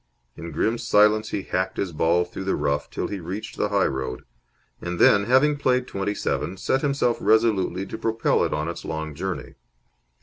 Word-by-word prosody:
In 85 0 -8
grim 110 +9 0
silence 105 +1 +3
he 100 - -3
hacked 95 +1 -2
his 95 - -2
ball 85 +3 +2
through 95 - -7
the 95 - +1
rough 70 +1 -1
till - - -3
he 100 - -4
reached 95 +5 -6
the 105 - -1
high 100 -2 +2
road; 65 -1 -3 0.6
and 90 0 -4
then, 100 +3 +5
having 135 +5 +4
played 125 -2 +1
twenty 100 -2 -3
seven, 95 - -2
set 135 +7 0
himself 140 -5 +1
resolutely 105 -4 +2
to 105 - -7
propel 115 0 +1
it - - -1
on 75 +1 -1
its 85 - -5
long 80 -1 -4
journey. 95 +5 -5
100 Hz, 190 wpm, -24 LUFS, 85-110 Hz, 0.6 s, then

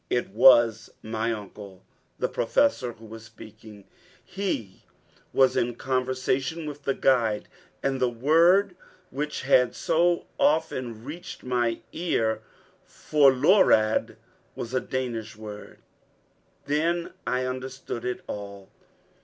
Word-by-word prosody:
It 120 - 0
was 115 +1 +5
my 110 +1 -2
uncle, 100 -3 -9 0.3
the - - 0
Professor, 125 - +1
who 115 0 -16
was 110 0 -10
speaking. 110 -1 -14 0.4
He 175 - -4 0.5
was 130 -1 +3
in 120 0 0
conversation 130 +5 -1
with 145 -1 -8
the 135 - 0
guide, 115 -5 +1 0.4
and 135 -1 0
the 125 -1 +2
word 170 - +3 0.4
which 150 +2 -4
had 125 -2 +3
so 175 +1 +1
often 130 -8 0
reached 170 +7 -9
my 120 -2 -1
ears, 115 -10 0 0.4
forlorad, 140 - +3 0.4
was 120 - -6
a 130 - +2
Danish 120 -5 -4
expression. 105 -1 -10 0.9
Then 165 +4 -1
I 130 0 0
understood 130 -1 -5
it 125 0 -3
all. 100 -1 -8
125 Hz, 110 wpm, -26 LUFS, 110-145 Hz, 0.9 s, was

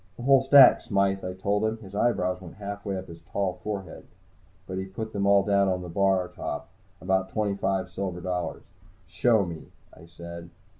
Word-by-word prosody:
"The 120 - -8
whole 135 0 +5
stack, 135 -1 +8
Smythe," 100 -3 0
I 90 - -4
told 100 +3 -1
him. 110 +1 0
His 100 -3 -13
eyebrows 90 -5 0
went 90 -3 -11
halfway 100 -1 -5
up 95 - -6
his 85 -1 -11
tall, 95 +2 -2
tall 90 - -19
forehead. 100 -5 -6 0.6
But 95 0 -5
he 95 - -3
put 110 +3 -7
them 100 -1 0
all 100 0 +5
down 100 -1 +2
on 90 -1 -1
the 90 - -7
bar 95 +1 +2
top, - - -6 0.3
about 95 0 0
twenty 105 0 -1
five 95 -1 -1
silver 90 -1 -4
dollars. 90 -1 -3 0.4
"Show 110 -5 +2
me," 85 -3 -8 0.3
I 85 - -15
said. 85 0 -10
95 Hz, 195 wpm, -26 LUFS, 90-100 Hz, 0.6 s, stack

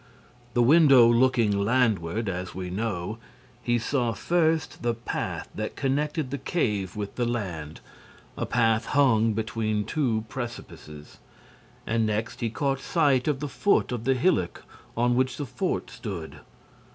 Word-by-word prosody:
The 120 - +4
window 140 -2 +7
looking 120 -2 +3
landward, 110 -2 +1
as 90 -1 -4
we 90 -1 -5
know, 105 0 -3 0.4
he 120 0 +1
saw, 120 0 0
first, 160 - 0
the 120 -1 0
path 115 - -4
that 110 0 -4
connected 145 +1 -1
the 140 - -3
cave 105 - -1
with 105 -1 -5
the 120 - +1
land, 90 -10 -4 0.5
a - - -3
path 115 -2 +2
hung 115 -5 +4
between 110 -1 -1
two 115 -8 0
precipices; 110 - -8 0.7
and, 115 0 +1
next, 110 +2 -2
he 115 - 0
caught 135 +2 -1
sight 140 -6 +2
of 145 -2 0
the 150 - -2
foot 200 +4 +1
of 120 -2 -4
the 135 0 +3
hillock 130 - 0 0.3
on 120 +1 +2
which 130 0 +1
the 145 - -3
fort 135 +9 -3
stood. 100 -9 -7
120 Hz, 145 wpm, -26 LUFS, 105-135 Hz, 0.7 s, window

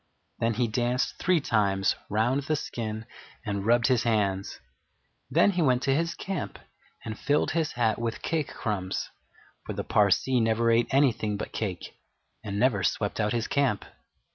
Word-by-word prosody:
Then 115 -1 +1
he 120 +1 +1
danced 120 +3 -1
three 180 -2 +3
times 100 -7 +1
round 115 +6 +1
the 155 +2 -1
skin 110 -5 -4 0.4
and 100 -1 -2
rubbed 120 0 +4
his 130 -3 +3
hands. 100 -4 0 0.7
Then 205 - +4
he 180 -2 0
went 130 -4 +2
to 135 - +2
his 165 +4 0
camp 190 -5 -4 0.5
and 110 -1 -5
filled 145 +1 +1
his 160 -2 0
hat 115 -3 +1
with 115 -1 -3
cake 160 -4 0
crumbs, 95 -4 -3 0.5
for - - -5
the - - -3
Parsee 105 +5 +3
never 115 +1 +2
ate 115 +1 +3
anything 120 -7 +2
but - - -5
cake, 95 -5 -5 0.4
and 100 -2 -4
never 110 -3 +2
swept 100 +5 -1
out 105 -1 +1
his 115 0 -1
camp. 135 -7 +1
115 Hz, 165 wpm, -27 LUFS, 105-135 Hz, 0.7 s, rubbed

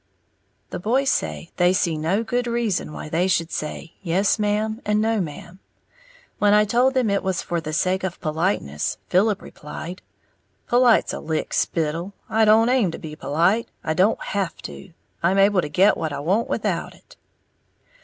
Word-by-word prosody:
The - - -4
boys 260 +8 +1
say 165 - -3
they 180 0 +4
see 175 -3 +1
no 165 +8 0
good 245 +1 -1
reason 235 -9 -1
why 150 - -7
they 165 +4 +1
should 170 -3 0
say 155 +2 -5
"yes 190 +5 +1
ma'am" 215 +2 0
and 210 0 +1
"no 220 -1 +1
ma'am." 170 +3 -8 0.8
When 205 0 +4
I 210 0 +5
told 250 +5 +2
them 245 -5 +2
it 200 - +1
was 190 -2 -2
for 170 -1 -2
the 155 - -5
sake 185 +4 0
of 185 -2 -4
politeness, 155 - -1
Philip 200 +2 +2
replied, 165 +4 -8 0.6
"Polite's 240 -1 +4
a - - -4
lick 155 0 -3
spittle, 165 +4 -1
I 220 0 +3
don't 220 +2 +5
aim 250 -7 +3
to 165 - -6
be 155 -1 -8
polite, 170 +10 +1
I 160 - 0
don't 190 +7 +2
have 195 -5 -2
to, 190 - -9 0.3
I'm 185 +3 +2
able 195 -1 +4
to 150 - -5
get 190 +7 +4
what 160 - -3
I 140 - -4
want 190 +10 0
without - - -2
it!" - - -20
190 Hz, 175 wpm, -23 LUFS, 165-215 Hz, 0.8 s, I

